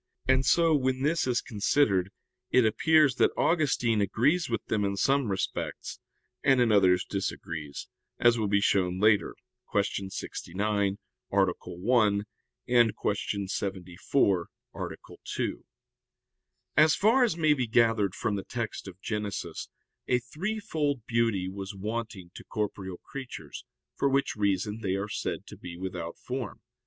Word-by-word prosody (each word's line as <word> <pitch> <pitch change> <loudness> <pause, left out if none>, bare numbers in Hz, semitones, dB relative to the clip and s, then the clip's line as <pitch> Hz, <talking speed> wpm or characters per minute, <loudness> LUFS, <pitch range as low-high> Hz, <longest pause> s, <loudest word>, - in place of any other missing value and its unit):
And 130 0 +4
so, 165 +4 +4
when 130 -2 +1
this 155 -1 +1
is 120 -2 +1
considered, 105 -4 +1 0.4
it 125 -2 +4
appears 140 +4 +4
that - - +5
Augustine 125 -9 +2
agrees 140 - +2
with 115 -2 -2
them 105 -1 0
in 100 0 -1
some 135 +2 +2
respects, 95 -1 -3 0.4
and 135 -2 +4
in 120 -2 +4
others 95 -3 +4
disagrees, 80 -6 -5 0.3
as 120 -1 +5
will 110 -3 0
be 100 0 +2
shown 95 -2 +2
later 105 0 +3 0.4
(Q. 100 -1 0
69, 100 +2 -2 0.3
A. 100 0 +4
1; 105 +2 +1 0.4
Q. 105 -4 +1
74, 95 0 0 0.2
A. - - -4 0.4
2). - - -3 1.1
As 155 0 +6
far 230 +6 +4
as 215 -9 +1
may 155 -2 +4
be 130 -5 -1
gathered 115 -4 +3
from 105 - -1
the 100 - -3
text 115 -4 -5
of 95 -1 -10
Genesis 105 -2 -4 0.4
a 125 - +3
threefold 150 - -3
beauty 115 -6 +1
was 95 +1 -6
wanting 105 -3 -5
to - - -10
corporeal 100 -4 -4
creatures, 135 +3 -8 0.3
for 140 - +1
which 135 -1 +1
reason 100 +1 0
they 95 -3 0
are 100 +1 -2
said - - -3
to - - -10
be 85 -1 -9
without 90 -2 -5
form. 125 -5 -5
110 Hz, 140 wpm, -28 LUFS, 100-130 Hz, 1.1 s, As